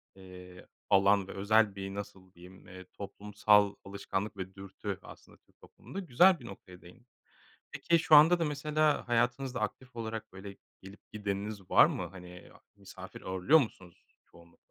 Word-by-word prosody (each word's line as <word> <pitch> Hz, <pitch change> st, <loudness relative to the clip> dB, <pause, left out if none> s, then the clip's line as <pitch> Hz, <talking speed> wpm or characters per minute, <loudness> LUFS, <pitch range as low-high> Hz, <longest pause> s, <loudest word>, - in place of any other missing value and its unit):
eee, 90 Hz, -1 st, -13 dB, 0.2 s
alan 100 Hz, 0 st, +3 dB
ve -, -, -8 dB
özel 105 Hz, +1 st, +2 dB
bir, 95 Hz, 0 st, -6 dB
nasıl 100 Hz, -2 st, -9 dB
diyeyim, 90 Hz, +2 st, -16 dB
eee, 95 Hz, 0 st, -12 dB
toplumsal 105 Hz, 0 st, +1 dB
alışkanlık 100 Hz, +1 st, -5 dB
ve 95 Hz, 0 st, -7 dB
dürtü 100 Hz, 0 st, -7 dB
aslında -, -, -15 dB
Türk -, -, -36 dB
toplumunda. 195 Hz, -, -10 dB
Güzel 180 Hz, +2 st, +4 dB
bir 120 Hz, -, -13 dB
noktaya 95 Hz, -4 st, -12 dB
değindin. 105 Hz, +8 st, -18 dB, 0.6 s
Peki, 170 Hz, -1 st, +1 dB
şu 155 Hz, -, +5 dB
anda 165 Hz, +4 st, +7 dB
da 165 Hz, -, 0 dB
mesela 150 Hz, 0 st, 0 dB
hayatınızda 125 Hz, +1 st, -1 dB
aktif 125 Hz, +4 st, -5 dB
olarak 110 Hz, -3 st, -6 dB
böyle 100 Hz, +1 st, -10 dB, 0.2 s
gelip 95 Hz, +2 st, -15 dB
gideniniz 100 Hz, -1 st, -5 dB
var -, -, +7 dB
mı? 90 Hz, -, -3 dB
Hani, 90 Hz, -1 st, -13 dB
a -, -, -19 dB, 0.2 s
misafir 95 Hz, -1 st, -12 dB
ağırlıyor 95 Hz, -, +3 dB
musunuz 95 Hz, -, -7 dB, 0.2 s
çoğunlukla? 85 Hz, 0 st, -21 dB
100 Hz, 155 wpm, -30 LUFS, 95-120 Hz, 0.6 s, anda